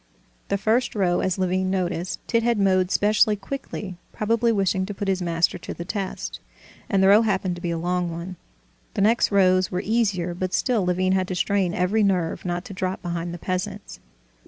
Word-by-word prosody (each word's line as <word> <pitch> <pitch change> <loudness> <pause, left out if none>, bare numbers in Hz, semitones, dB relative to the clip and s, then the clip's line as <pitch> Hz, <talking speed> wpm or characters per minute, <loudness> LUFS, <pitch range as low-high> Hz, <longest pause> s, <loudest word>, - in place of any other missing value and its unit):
The 200 - 0
first 225 +5 +1
row, 180 -4 +2
as 185 0 0
Levin 185 0 0
noticed, 180 -2 -2
Tit 230 - +2
had 235 0 +1
mowed 185 -2 +2
specially 210 +1 +3
quickly, 200 -3 -6
probably 230 +2 +1
wishing 195 -3 +1
to 205 - -6
put 200 - -4
his 190 -1 0
master 170 -1 +1
to - - -7
the 170 - -6
test, 195 0 -4 0.5
and 195 -1 +3
the - - +6
row 205 +2 +7
happened 195 -4 0
to - - -9
be 175 - -2
a 170 - -1
long 175 +1 -1
one. 170 +2 -6 0.6
The 200 - 0
next 220 +3 +3
rows 185 -2 +4
were 180 +2 -2
easier, 200 -6 0
but 185 +1 -2
still 240 -6 +1
Levin 185 +1 +1
had 190 -1 +1
to 185 - -3
strain 190 -1 +1
every 185 +5 +1
nerve 185 -5 0
not 175 0 -2
to - - -8
drop 185 0 -3
behind 175 -1 -3
the 175 - -6
peasants. 195 +3 -4
190 Hz, 200 wpm, -24 LUFS, 180-205 Hz, 0.6 s, row